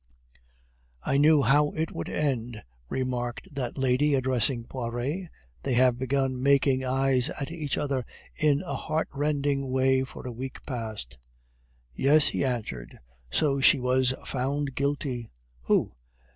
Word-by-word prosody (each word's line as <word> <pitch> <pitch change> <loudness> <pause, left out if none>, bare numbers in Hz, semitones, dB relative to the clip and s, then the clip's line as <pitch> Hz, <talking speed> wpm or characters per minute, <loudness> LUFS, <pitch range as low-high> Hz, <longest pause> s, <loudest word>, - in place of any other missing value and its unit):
"I 135 - +1
knew 150 0 +5
how 145 +4 +4
it 160 0 -2
would 85 - -5
end," 120 -7 -2 0.3
remarked 125 0 -3
that 130 -2 -4
lady, 135 +2 +2
addressing 130 -2 +1
Poiret. 130 +9 -4 0.3
"They 125 - -1
have 125 0 +4
been 130 0 0
making 135 -1 +3
eyes 130 -1 +2
at 140 +2 -5
each 155 -5 -3
other 140 -3 -1 0.3
in 145 -2 +2
a 140 - -4
heartrending 145 -1 -1
way 130 0 +3
for 130 - -9
a 125 - -4
week 130 +3 -7
past." 110 - -5 0.7
"Yes," 145 - +4
he - - -1
answered. 110 - -3 0.3
"So 140 - +1
she 135 - +6
was 130 +1 +2
found 135 +2 -2
guilty." 140 -4 -2 0.4
"Who?" - - +2
130 Hz, 130 wpm, -27 LUFS, 125-140 Hz, 0.7 s, she